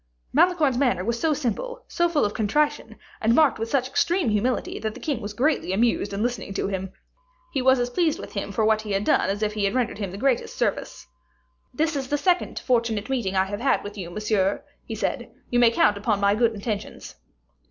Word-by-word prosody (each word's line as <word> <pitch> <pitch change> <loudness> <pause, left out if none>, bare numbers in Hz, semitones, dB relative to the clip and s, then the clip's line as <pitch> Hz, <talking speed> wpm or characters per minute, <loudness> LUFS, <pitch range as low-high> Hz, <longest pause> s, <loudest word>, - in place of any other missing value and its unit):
Malicorne's 310 -9 +3
manner 245 -9 +1
was 235 +1 -1
so 320 - +1
simple, 305 - -3
so 345 0 +1
full 310 -8 +2
of 205 - -2
contrition, 290 +8 0 0.3
and 225 +2 +3
marked 305 -7 +4
with 225 +1 -3
such 255 -1 +1
extreme 340 +2 +1
humility, 220 +4 -1
that 220 0 -4
the - - -9
king 280 -7 -2
was 205 - -5
greatly 270 - +1
amused 220 -1 +1
in 200 +2 -2
listening 240 -5 -3
to - - -1
him. 190 -1 -4 0.6
He 270 - 0
was 260 0 +4
as 245 0 -1
pleased 325 +2 +1
with - - -9
him - - -3
for 220 - +1
what 220 0 +3
he 210 -2 -4
had 195 +1 0
done 195 - +2
as 205 +2 -1
if 210 0 0
he 210 -1 -1
had 195 - 0
rendered 245 -4 -1
him 200 -3 -3
the 190 - -8
greatest 255 +2 0
service. - - -2 0.7
"This 315 0 0
is 270 -2 -2
the 290 - 0
second 360 +4 +1
fortunate 230 -2 0
meeting 215 -8 -1
I 190 0 +3
have 205 +1 -5
had 270 +3 +1
with 205 0 -7
you, 185 -4 -6
monsieur," 205 0 0 0.2
he - - -4
said; - - -3 0.2
"you 245 - +3
may 240 -1 +7
count 210 -2 +3
upon 210 -1 0
my 200 0 +3
good 230 +1 +2
intentions." 210 0 -5
230 Hz, 225 wpm, -24 LUFS, 205-275 Hz, 0.7 s, may